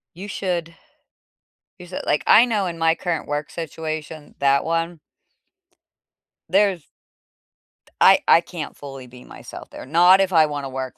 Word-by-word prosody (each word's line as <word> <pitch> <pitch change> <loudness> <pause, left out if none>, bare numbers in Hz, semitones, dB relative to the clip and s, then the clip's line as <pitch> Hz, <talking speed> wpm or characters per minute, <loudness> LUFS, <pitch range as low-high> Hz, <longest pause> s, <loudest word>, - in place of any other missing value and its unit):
You 195 +4 -9
should 175 -4 -3 1.1
use 180 0 -12
it, - - -5
like 150 - +1
I 230 - +7
know 215 -5 -1
in 170 -2 -5
my 165 0 +2
current 170 -2 -4
work 145 0 -4
situation, 155 -2 -7
that 140 0 +3
one 165 0 -2 1.5
there's 190 -3 +1 1.0
d - - -24
I - - +7
I - - +6
can't - - -8
fully 135 -3 -10
be 125 0 -15
myself - - -12
there, - - -10
not 175 +7 +5
if 190 -1 -1
I 160 -2 +5
wanna 145 -2 -5
work 130 -1 -6
165 Hz, 155 wpm, -21 LUFS, 145-180 Hz, 1.5 s, I